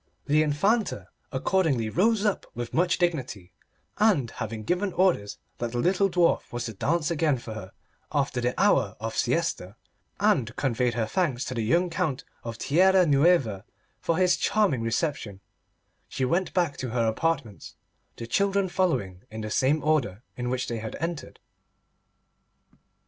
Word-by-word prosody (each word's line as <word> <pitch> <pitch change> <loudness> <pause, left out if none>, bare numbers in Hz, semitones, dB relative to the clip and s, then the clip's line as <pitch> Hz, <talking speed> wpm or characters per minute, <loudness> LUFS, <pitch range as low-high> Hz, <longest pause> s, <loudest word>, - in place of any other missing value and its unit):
The 150 +1 +3
Infanta 195 +10 0 0.2
accordingly 155 - +1
rose 210 - +2
up 205 - 0
with 120 0 -5
much 175 +1 +2
dignity, 130 - -2 0.5
and 190 - +3
having 110 -1 -5
given 180 - -1
orders 175 - +1 0.2
that 120 0 -3
the - - -2
little 190 +9 +2
dwarf 175 -1 +1
was 120 0 -3
to 115 - -5
dance 160 - 0
again 155 -4 +1
for 115 -2 -8
her 100 -3 -8 0.4
after 135 -4 0
the 125 +1 -1
hour 130 - +3
of 110 +1 -4
siesta, 125 - -1 0.4
and 120 -1 +2
conveyed 125 -3 0
her 115 -2 0
thanks 135 -1 -1
to - - -4
the 115 - -2
young 170 +11 +1
Count 150 -5 -2 0.2
of 115 -1 -6
Tierra 185 +7 +4
Nueva 140 - +3 0.4
for 165 - 0
his 180 -1 +3
charming 200 - +1
reception, 115 - -2 0.7
she 130 - -2
went 175 +8 0
back 170 -6 0
to 130 - -4
her 115 0 0
apartments, 115 -3 -2 0.4
the 115 - -7
children 195 +8 +1
following 100 - -1
in 110 0 -7
the 110 0 -5
same 140 +6 +2
order 130 -9 0
in 125 0 -3
which 130 0 -2
they 115 -1 -3
had 110 0 -6
entered. 165 0 -5
140 Hz, 155 wpm, -26 LUFS, 115-175 Hz, 0.7 s, Tierra